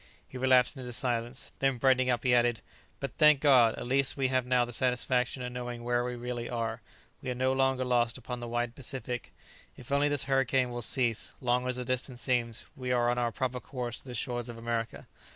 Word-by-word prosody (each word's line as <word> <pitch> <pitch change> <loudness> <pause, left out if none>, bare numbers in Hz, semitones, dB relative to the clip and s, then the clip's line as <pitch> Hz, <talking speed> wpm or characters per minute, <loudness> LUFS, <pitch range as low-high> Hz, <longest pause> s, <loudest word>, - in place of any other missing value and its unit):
He - - -15
relapsed 130 +1 +4
into 125 -2 -7
silence. 120 +1 -1
Then, 135 -2 +1
brightening 130 0 +3
up, 125 - +1
he 125 -2 +3
added, 120 -2 +3 0.4
"But, 140 - -4
thank 150 -2 +6
God! 130 -6 +5
at - - -6
least 135 +3 +2
we 135 -1 +1
have 130 -1 0
now 125 -1 +3
the 120 - -8
satisfaction 125 +1 0
of 125 - -4
knowing 120 -1 -5
where 120 0 +1
we 125 0 -3
really 120 0 -4
are; 115 -2 -3 0.4
we 130 - -5
are 125 - -2
no 130 +1 +1
longer 135 -1 +1
lost 120 -1 +1
upon 125 0 -6
the 120 - -6
wide 120 0 -2
Pacific; 125 -2 -5 0.5
if 130 +2 -11
only 140 +1 +3
this 145 -1 +1
hurricane 135 -2 +1
will 120 0 -4
cease, 120 -2 0
long 125 0 +1
as 125 - -1
the 125 0 -4
distance 130 0 -2
seems, 120 -3 0
we 130 -1 -4
are 120 -1 +3
on 125 - -1
our 120 -1 0
proper 130 0 -2
course 125 -2 -5
to - - -15
the 125 - -6
shores 120 +1 -3
of 115 - -7
America." 115 0 -3
125 Hz, 220 wpm, -30 LUFS, 120-130 Hz, 0.5 s, thank